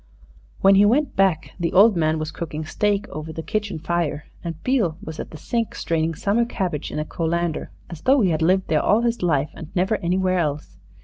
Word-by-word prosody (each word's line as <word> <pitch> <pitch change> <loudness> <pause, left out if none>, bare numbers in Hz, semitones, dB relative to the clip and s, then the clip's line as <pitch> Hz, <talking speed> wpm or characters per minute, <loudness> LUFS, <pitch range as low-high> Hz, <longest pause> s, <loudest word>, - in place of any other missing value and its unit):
When 195 0 +6
he 195 +1 +6
went 255 +7 +2
back 190 -5 +2
the 170 -1 -1
old 205 +3 +6
man 160 -1 +1
was 155 0 -4
cooking 155 -2 -5
steak 205 +4 0
over 155 +2 -6
the 160 +1 -6
kitchen 205 -3 -2
fire, 160 -2 -2 0.2
and 165 -2 -5
Beale 220 -12 +1
was 160 -6 -8
at - - -5
the 155 - -10
sink 230 +6 -2
straining 165 0 -1
summer 205 +8 +1
cabbage 185 - -3
in - - -5
a 150 - -1
colander, 170 0 -2 0.2
as 170 -3 -9
though 270 0 +4
he 190 -5 +3
had 160 0 -1
lived 185 +3 +2
there 155 - +2
all 215 +3 +3
his 235 0 0
life 150 -5 +1
and 160 - -9
never 190 +4 +1
anywhere 185 +1 0
else. 150 -3 -3
175 Hz, 210 wpm, -22 LUFS, 160-205 Hz, 0.2 s, When